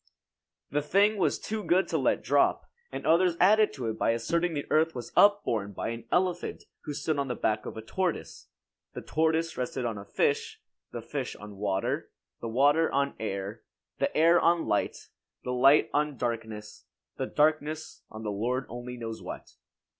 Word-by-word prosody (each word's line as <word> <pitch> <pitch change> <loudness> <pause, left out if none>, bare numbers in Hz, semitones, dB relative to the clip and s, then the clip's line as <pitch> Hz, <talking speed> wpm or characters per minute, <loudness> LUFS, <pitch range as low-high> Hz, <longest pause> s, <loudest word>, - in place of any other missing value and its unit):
The 145 - +1
thing 200 +8 +3
was 185 - +1
too 215 -1 -4
good 185 +1 +2
to - - +1
let - - +1
drop; - - +2 0.3
and - - -6
others 170 +2 +3
added 210 +3 +5
to 125 -4 -4
it 110 - -3
by 115 - +2
asserting 170 +9 0
the 145 - -3
earth 160 0 +3
was 120 -2 -6
upborne 115 - +3
by 95 - -3
an 115 0 -6
elephant 180 -1 0 0.2
who 150 - -4
stood 150 0 -1
on 140 - -1
the 125 - -2
back 105 0 -1
of - - -7
a 110 - -6
tortoise. 180 +8 -3 0.5
The - - -6
tortoise 160 +1 0
rested 125 0 -2
on 110 -3 -3
a - - -8
fish; - - -1 0.3
the - - -6
fish - - -4
on 105 -1 -11
water; 100 -1 -1 0.3
the 115 - -5
water 145 +7 +3
on 140 0 +1
air; 100 0 -4 0.4
the - - +1
air 165 +2 +6
on 170 0 +3
light; 105 - -1 0.3
the 125 - -2
light 135 +4 +5
on 150 -1 0
darkness; 110 -3 -5 0.3
the - - -2
darkness 155 +1 0
on 110 +1 -9
the 105 - -2
Lord 125 +6 -1
only 120 +1 -7
knows 115 -1 -6
what. - - -8
140 Hz, 180 wpm, -28 LUFS, 115-165 Hz, 0.5 s, air